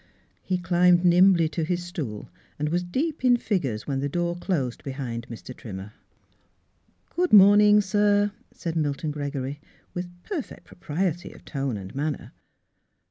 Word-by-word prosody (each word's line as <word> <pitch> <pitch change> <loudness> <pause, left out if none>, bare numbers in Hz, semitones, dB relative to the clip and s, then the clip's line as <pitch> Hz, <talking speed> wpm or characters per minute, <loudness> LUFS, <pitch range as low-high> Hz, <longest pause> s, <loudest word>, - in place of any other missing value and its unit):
He 185 - -1
climbed 180 0 +3
nimbly 175 -1 +5
to 160 +1 -2
his 175 +2 -1
stool 145 - -5 0.3
and 150 +1 -1
was 175 +3 +1
deep 270 - -2
in 245 -1 +5
figures 135 - -2
when 135 -1 -2
the 140 +1 -1
door 175 +2 -1
closed 160 -9 -2
be 135 - -5
hind 120 -4 -5
Mr. 120 +2 -9
Trimmer. 100 -1 -8 0.6
" - - -40
Good 360 +1 +1
morning, 205 +1 +7
sir," 205 +1 +2 0.2
said 165 -2 -5
Milton 150 0 -1
Gregory, 145 -1 -4 0.3
with 175 0 -7
perfect 330 - -6
propriety 175 +1 -3
of - - -17
tone 135 -6 -3
and 95 -1 -8
manner. 145 +2 -3
175 Hz, 150 wpm, -25 LUFS, 140-185 Hz, 0.6 s, morning